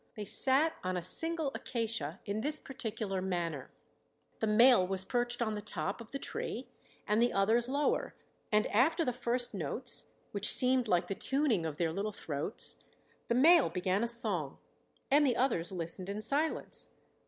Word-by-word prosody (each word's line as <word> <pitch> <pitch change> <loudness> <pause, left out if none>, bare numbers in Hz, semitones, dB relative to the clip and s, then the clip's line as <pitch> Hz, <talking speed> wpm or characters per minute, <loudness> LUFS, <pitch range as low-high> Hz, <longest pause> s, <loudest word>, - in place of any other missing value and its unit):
They 210 -2 -5
sat 275 +9 +2
on 185 0 -1
a 175 - -4
single 320 - -2
acacia 225 - -3
in 205 +2 -2
this 300 +4 0
particular 215 -7 -4
manner: 170 -7 -3 0.7
the 220 - 0
male 230 -2 +5
was 190 0 -3
perched 240 +1 -1
on 220 -2 -2
the 210 - -4
top 195 +3 -3
of 225 - -11
the 275 - -4
tree - - -5 0.4
and 210 +2 +2
the 240 - +3
others 225 +5 +2
lower, 285 +2 0 0.4
and 210 0 +3
after 315 - +3
the 250 - 0
first 245 0 -2
notes, 205 - 0 0.2
which 200 0 +3
seemed 255 -1 +4
like 175 -3 +2
the 195 - -2
tuning 255 - +1
of 150 -2 -6
their 165 -2 0
little 200 +4 -2
throats, 155 +1 -2 0.4
the 235 - +1
male 320 +5 +6
began 185 +3 -1
a - - +1
song 210 -11 0 0.5
and 290 +2 +5
the 255 -5 +2
others 185 -10 0
listened 180 +1 -5
in 200 +1 -3
silence. 290 +8 -1
220 Hz, 170 wpm, -32 LUFS, 185-255 Hz, 0.7 s, male